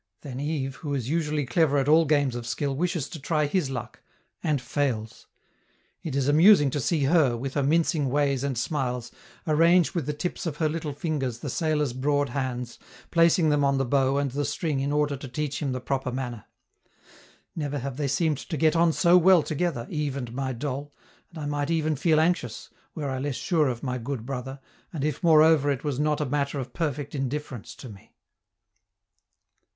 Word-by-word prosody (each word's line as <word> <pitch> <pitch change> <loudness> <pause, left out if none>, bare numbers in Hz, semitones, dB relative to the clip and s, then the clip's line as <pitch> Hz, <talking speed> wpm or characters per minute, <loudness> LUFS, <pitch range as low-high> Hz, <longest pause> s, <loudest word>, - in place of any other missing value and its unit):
Then 130 -3 -7
Yves, 140 -2 -3
who 145 -3 -3
is 130 -2 -3
usually 155 -3 0
clever 145 +2 +2
at 135 0 +1
all 160 +2 +5
games 145 -4 +2
of 120 -1 -5
skill, 135 +2 -2
wishes 165 -1 -1
to 160 - -8
try 150 +2 0
his 145 -1 0
luck, 120 -3 -6 0.4
and 150 -3 0
fails. 125 -5 -3 0.7
It 155 -5 -4
is 140 -1 +1
amusing 150 -1 +6
to 145 - -1
see 150 +3 0
her, 140 -5 +3
with 135 +3 -5
her 145 - +1
mincing 155 0 +2
ways 140 -1 +1
and 140 -3 -2
smiles, 125 -3 -2 0.3
arrange 165 +3 +4
with 165 -7 -2
the 150 - -1
tips 180 +4 -4
of 150 -3 -4
her 155 - +1
little 155 -1 -3
fingers 140 -5 -2
the 135 +2 -5
sailor's 150 -4 0
broad 145 +2 0
hands, 125 -3 -4 0.3
placing 165 -1 +4
them 145 -1 +2
on 140 -1 +2
the 135 - +1
bow 135 +1 +2
and 140 -2 0
the 145 +3 -2
string 145 0 -1
in 140 +1 -1
order 145 -1 +1
to 135 0 -8
teach 145 +4 -3
him 140 -3 -1
the 130 - -2
proper 130 0 -2
manner. 125 -4 -5 1.1
Never 145 -3 -3
have 135 -1 -5
they 145 -2 -1
seemed 145 +2 +1
to 160 - -5
get 155 +3 +3
on 165 0 +4
so 180 0 +5
well 180 -2 +6
together, 155 -6 -2
Yves 150 -4 -2
and 120 -3 -5
my 135 +1 -2
doll, 140 +3 -4 0.4
and 170 - -13
I 150 - -5
might 145 0 -2
even 155 -2 +1
feel 155 +2 +3
anxious, 160 -9 -1 0.2
were 145 -4 -3
I 130 - -3
less 140 0 -2
sure 160 -1 +1
of 120 -2 -3
my 125 -2 -2
good 120 -1 -5
brother, 135 +1 -5 0.3
and 155 -5 -4
if, 150 -3 -2
moreover, 160 -3 +5
it 140 -4 -1
was 145 -3 -2
not 150 0 +1
a 150 - 0
matter 140 +1 -1
of 130 -3 -5
perfect 145 -3 -3
indifference 135 -3 -4
to 130 - -10
me. 100 -4 -14
145 Hz, 200 wpm, -26 LUFS, 130-155 Hz, 1.1 s, amusing